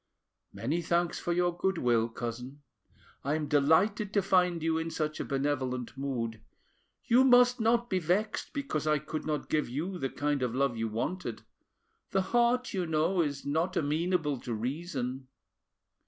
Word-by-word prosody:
"Many 155 +9 -2
thanks 170 +1 0
for 175 - -2
your 175 0 +1
goodwill, 125 -12 +1
cousin; 125 +5 -6 0.6
I 145 +3 0
am 155 -1 -2
delighted 175 +9 +3
to 200 - +3
find 180 -3 +2
you 160 0 +1
in 165 0 -3
such 155 -1 -3
a - - -1
benevolent 135 -3 -2
mood. 120 -5 -3 0.6
You 245 +3 +5
must 245 -1 +6
not 235 +1 +2
be 190 -5 0
vexed 190 +6 -1
because 275 - -3
I 150 0 +4
could 155 +2 -5
not 150 -1 -2
give 150 -5 0
you 170 +9 -3
the 135 - -1
kind 145 0 -1
of 125 -1 -1
love 135 -2 +1
you 115 0 -1
wanted; 150 +12 -3 0.7
the 190 -1 +1
heart, 240 +1 +2
you 185 -3 -1
know, 160 +4 +2
is 145 -3 -2
not 165 +6 0
amenable 155 -1 0
to 120 -2 -4
reason." 130 +1 -4
155 Hz, 160 wpm, -30 LUFS, 135-185 Hz, 0.7 s, must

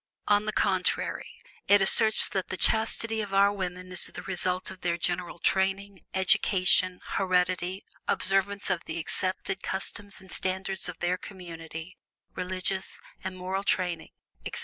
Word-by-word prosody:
On 205 0 +3
the 215 - -1
contrary, 190 -3 0 0.4
it 205 0 +6
asserts 220 +3 +6
that 190 -1 -2
the 190 - -5
chastity 220 +2 +2
of 200 -2 -4
our 200 +1 +5
women 185 -2 -5
is 180 - -1
the - - -6
result 185 0 +1
of 185 -1 -12
their 170 -1 0
general 175 0 -2
training, 195 +1 0
education, 185 -1 +3
heredity, 185 0 0 0.2
observance 195 +1 +1
of 175 -2 -1
the 160 - -5
accepted 185 +3 -2
customs 200 +1 -3
and 190 -2 -13
standards 190 0 -2
of 180 - -7
their 180 +1 0
community, 165 -2 -9 0.3
religious 185 +1 -3 0.2
and 185 0 -5
moral 190 +2 -3
training, 180 -4 -1 0.3
etc. - - -4
185 Hz, 145 wpm, -28 LUFS, 180-195 Hz, 0.4 s, it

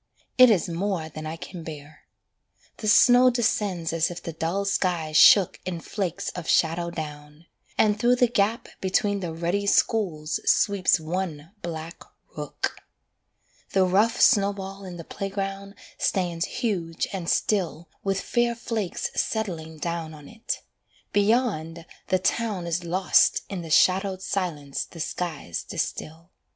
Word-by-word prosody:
It 255 -1 +8
is 205 -3 +2
more 170 -1 -2
than 155 0 -7
I 160 - -4
can 175 +1 -9
bear. 150 -1 -10 0.7
The 215 - -5
snow 245 +3 +7
descends 205 -8 0
as 165 +1 +1
if 175 0 -8
the 165 - -5
dull 170 +5 -2
sky 180 -5 0
shook 175 +5 +6
In 175 -2 -4
flakes 185 0 -3
of 175 -3 -7
shadow 170 +1 +2
down; 150 -1 -8 0.3
and 210 -1 +3
through 245 +1 +4
the 245 0 +4
gap 225 +1 0
Between 200 +2 +1
the 175 -3 -4
ruddy 175 +5 -1
schools 165 -9 +1
sweeps 200 -4 +3
one 160 -1 -4
black 165 0 -6 0.3
rook. 150 -2 -4 1.0
The 190 -1 +4
rough 210 +6 +2
snowball 195 -3 +2
in 180 -2 -8
the 165 - -7
playground 195 +1 -5 0.2
stands 175 -3 0
huge 175 -10 -2
and 180 -3 -3
still 175 -5 0 0.2
With 195 -1 0
fair 240 -1 0
flakes 225 -5 -3
settling 165 -8 -3
down 165 -1 -4
on 150 -2 -13
it. 225 +1 -5 0.5
Beyond, 200 -7 +1 0.2
the 185 - +3
town 200 -1 -1
Is 170 +1 -2
lost 180 +2 +3
in 195 -3 -4
the 165 - -8
shadowed 190 +3 +3
silence 155 -9 -2
the 170 - -13
skies 155 - -4
distil. 165 +3 -5
180 Hz, 140 wpm, -25 LUFS, 165-200 Hz, 1.0 s, It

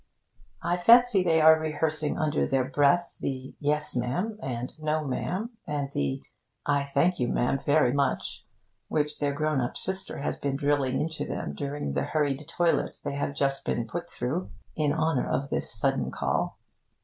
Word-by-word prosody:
I 175 - +1
fancy 230 +2 +6
they 165 -3 +3
are 160 0 +7
rehearsing 155 -1 -1
under 155 -1 +1
their 135 -1 +2
breath 145 +6 +2
the 130 -1 -4
'Yes, 150 0 +1
ma' 125 0 0
am,' 210 - -2
and 125 -1 -3
the - - -19
'No, 155 0 +1
ma'am,' 185 - -2 0.2
and 145 -2 -2
the 70 -1 -1 0.4
'I 140 -1 +2
thank 140 +6 +1
you, 125 - +1
ma'am, 125 +3 +1
very 145 -4 +4
much,' 140 0 -1 0.4
which 150 -1 -1
their 145 -1 +1
grown 155 -1 0
up 120 - -3
sister 190 0 -4
has - - -1
been 140 -1 -1
drilling 140 -2 +1
into 160 0 -2
them - - -4
during 140 - -3
the - - 0
hurried 145 -2 0
toilet 175 -1 +1
they - - -3
have 140 0 -2
just 135 -1 0
been 120 - -1
put 175 +8 -5
through 140 +10 -3 0.3
in 150 -2 +1
honour 160 -3 +1
of 140 +1 -1
this - - 0
sudden - - +1
call. - - -1
145 Hz, 175 wpm, -27 LUFS, 135-160 Hz, 0.4 s, are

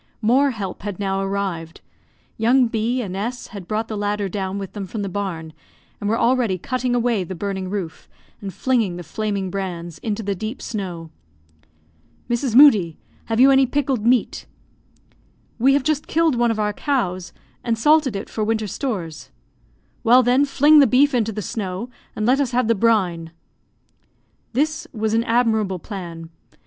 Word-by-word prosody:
More 260 +6 +4
help 205 -7 -5
had 205 -2 -5
now 195 -1 -1
arrived. 195 -4 -3 0.5
Young 245 +4 +3
B 230 +3 -1
and 190 -3 -5
S 235 +5 -4
had 200 -5 -9
brought 215 +1 -2
the 220 - -5
ladder 205 0 -1
down 190 0 -3
with 195 -2 -6
them 200 -2 -5
from 210 +2 -4
the 200 - -3
barn, 175 -5 -4 0.5
and 205 - -2
were 225 - +1
already 235 -6 +2
cutting 250 +5 -2
away 235 -4 +1
the 185 +2 -7
burning 190 0 -4
roof, 190 -5 -5 0.3
and 195 -2 -5
flinging 230 -6 0
the 175 - -7
flaming 200 +2 -3
brands 175 -4 -5
into 220 0 -3
the 200 0 -1
deep 215 +6 -5
snow. 180 -7 -5 1.2
"Mrs. 240 0 -1
Moodie, 210 - +6 0.3
have 225 0 -1
you 270 +2 +7
any 270 -1 +5
pickled 270 -4 -1
meat?" 245 +1 +1 1.1
"We 265 +4 +4
have 280 -1 +2
just 305 0 -1
killed 330 -1 +2
one 240 -1 +2
of 225 - -1
our 210 0 0
cows, 185 - -2 0.3
and 230 -1 0
salted 295 -1 +3
it 195 - -4
for 215 - -3
winter 220 0 0
stores." 190 - -4 0.7
"Well, 250 +2 +6
then, 250 +4 +3
fling 290 +2 +5
the 280 - +6
beef 280 +3 +4
into 225 -3 +1
the 210 0 -5
snow, 195 +4 -4 0.2
and 215 - -2
let 255 +4 +3
us 260 -3 -2
have 245 -2 +2
the 230 - +4
brine." 185 -7 +1 1.2
This 310 +5 -1
was 220 -2 -1
an 230 +1 +2
admirable 220 -5 +1
plan. 170 -4 -8
215 Hz, 170 wpm, -21 LUFS, 190-250 Hz, 1.2 s, you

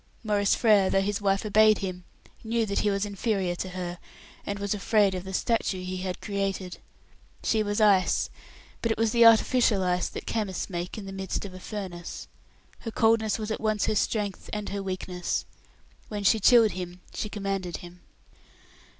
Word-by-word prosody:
Maurice 205 -2 +2
Frere, 210 -5 +4
though 195 - +3
his 200 +1 -1
wife 195 +1 +1
obeyed 215 0 +5
him, 180 -2 -5 0.4
knew 230 0 0
that 200 -1 -1
he 210 - +2
was 200 0 0
inferior 200 -3 -1
to 185 +1 -5
her, 180 -1 -5 0.5
and 200 - -2
was 200 0 -1
afraid 205 -1 +2
of 180 -1 -4
the 190 - -6
statue 195 -2 0
he 185 0 -4
had 185 -1 -4
created. 195 -3 -3 0.6
She 220 - +2
was 205 +1 -1
ice, 200 -4 +3 0.5
but 230 - 0
it - - 0
was 225 0 +2
the 235 0 +7
artificial 230 -2 +4
ice 180 -1 0
that - - -7
chemists 200 -4 -3
make 175 +2 -4
in 210 - -6
the 195 - -7
midst 190 +1 -3
of 190 - -8
a 185 - -9
furnace. 185 -4 -6 0.5
Her 230 - -6
coldness 225 -1 +2
was 215 -1 -4
at - - -3
once 215 -1 +1
her - - +1
strength 205 -2 -1
and 210 -1 -4
her 200 0 -3
weakness. 185 -2 -3 0.6
When 210 -1 -4
she 215 +3 +4
chilled 225 0 +6
him, 180 0 -7
she 210 - -3
commanded 195 -4 -3
him. 175 0 -12
200 Hz, 185 wpm, -27 LUFS, 185-215 Hz, 0.6 s, the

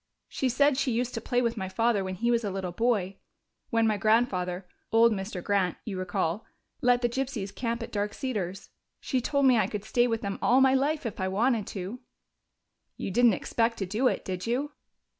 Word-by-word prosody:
She 265 - -1
said 280 +2 +3
she 260 - +1
used 245 +2 -1
to 230 - -3
play 245 +2 0
with 235 -1 0
my 190 -2 -3
father 225 0 +1
when 185 0 -4
he 235 +5 0
was 235 -1 +2
a 205 - -1
little 190 -2 -4
boy, 200 -2 0 0.5
when 230 -1 +2
my 215 -1 +2
grandfather 195 -4 +1 0.3
old 230 +1 +5
Mr. 195 -3 -4
Grant, 195 -4 +1
you 210 - -4
recall 180 +1 -1 0.4
let 245 0 +3
the - - +4
gypsies 240 -5 -3
camp 235 +1 -2
at - - -8
Dark 205 0 -2
Cedars. 195 -7 -4 0.3
She 255 - -1
told 280 +2 +1
me 250 -3 +5
I - - +2
could 210 -2 -5
stay 240 +2 +2
with 225 -2 -1
them 200 -1 -4
all 250 +2 +4
my 265 0 +5
life 285 +2 +1
if 225 - -4
I 190 - 0
wanted 220 +2 +1
to." 195 +5 -6 1.0
"You - - -4
didn't 240 +2 +5
expect 230 +4 0
to 195 - -2
do 215 +8 +1
it, - - -1
did 185 +2 -4
you?" 270 +5 -1
225 Hz, 210 wpm, -28 LUFS, 195-245 Hz, 1.0 s, old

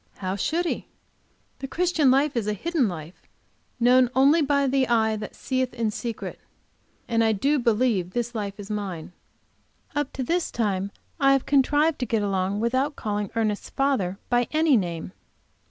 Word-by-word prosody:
How 185 0 -3
should 325 - 0
he? - - -3 0.7
The 270 - -5
Christian 335 -2 +2
life 275 +2 +3
is 225 -3 -1
a 210 - +1
hidden 310 - 0 0.9
known 250 +1 +5
only 280 +5 +5
by 280 -1 +2
the 265 -1 +2
eye 220 -2 +2
that 210 -1 -7
seeth 260 -2 -2
in 230 -3 0
secret. 230 +1 -5 0.7
And 230 0 +2
I 220 -1 +3
do 280 +8 +1
believe 230 -6 +1
this 240 0 -2
life 205 -3 -4
is 205 +1 -7
mine. 190 -7 -4 0.8
Up 290 -1 -1
to 265 - -3
this 340 +6 0
time 200 -4 -1 0.3
I 275 -1 +5
have 275 - +1
contrived 290 +3 +3
to 250 - -2
get 215 -1 0
along 195 0 -1
without 260 +5 0
calling 205 -1 -3
Ernest's 215 -2 -1
father 235 -10 0
by 245 -1 +2
any 310 -2 +4
name. 175 -5 -2
240 Hz, 165 wpm, -25 LUFS, 210-275 Hz, 0.9 s, known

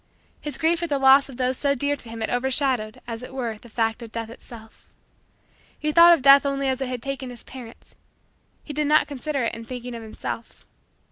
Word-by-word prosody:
His 295 - -3
grief 330 +1 +1
at 340 - -2
the 285 - +1
loss 270 +1 +6
of 255 - -10
those 255 0 0
so 280 -1 +2
dear 285 +2 0
to 245 -5 -5
him 225 0 -7
had 220 - -2
overshadowed, 250 -3 0
as 230 -1 -6
it 255 +1 -9
were, 230 -5 -3
the 235 - -15
fact 225 +1 -1
of 230 -2 -9
Death 225 -1 -5
itself. 225 -2 -14 0.9
He 305 0 -1
thought 340 +2 +8
of 285 - -8
Death 275 0 +8
only 275 -1 -1
as 265 0 -1
it 265 - -1
had 250 -2 -5
taken 275 -1 -4
his 245 -1 -10
parents; 245 -3 -12 0.7
he 295 - -7
did 300 0 0
not 305 +1 +4
consider 285 -1 -3
it 230 - -1
in 230 - -7
thinking 245 +1 -7
of 230 - -7
himself. 225 +1 -7
260 Hz, 220 wpm, -24 LUFS, 230-280 Hz, 0.9 s, thought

